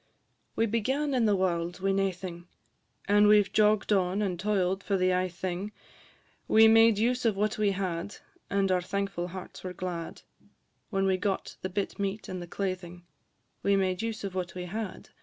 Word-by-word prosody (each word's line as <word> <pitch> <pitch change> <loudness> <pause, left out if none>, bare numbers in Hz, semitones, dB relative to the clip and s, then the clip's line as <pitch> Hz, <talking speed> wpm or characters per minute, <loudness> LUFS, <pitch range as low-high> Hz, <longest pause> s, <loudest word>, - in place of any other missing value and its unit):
We 225 - +2
began 265 +7 0
in 245 -3 +2
the 210 -2 +3
warld 175 -1 -1
wi' 195 +1 +1
naething, 185 -3 -2 0.6
And 205 +1 +5
we 210 0 +7
've 205 - -1
jogg'd 215 0 +3
on, 190 +1 +1
and 180 -4 -2
toil'd 195 -1 0
for 195 0 0
the 185 0 +2
ae 185 0 +1
thing; 180 +3 -4 0.8
We 220 0 +7
made 225 -1 +6
use 245 +4 +1
of 225 -4 +2
what 210 +2 -1
we 210 -1 +3
had, 185 0 -3 0.3
And 195 -1 +1
our 180 -1 +2
thankful 195 -1 -3
hearts 185 +1 -9
were 185 -1 -5
glad, 175 -2 -5 0.7
When 195 -2 0
we 190 -1 +2
got 195 0 -2
the 185 - -3
bit 200 +2 -3
meat 200 +1 -3
and 185 -1 -5
the 175 - -7
claithing; 180 -2 -4 0.6
We 200 - +3
made 185 -1 0
use 225 -2 -4
of 195 -2 -4
what 180 -2 -4
we 180 -1 -4
had, 210 +2 -5
&c. - - -23
195 Hz, 190 wpm, -29 LUFS, 180-210 Hz, 0.8 s, we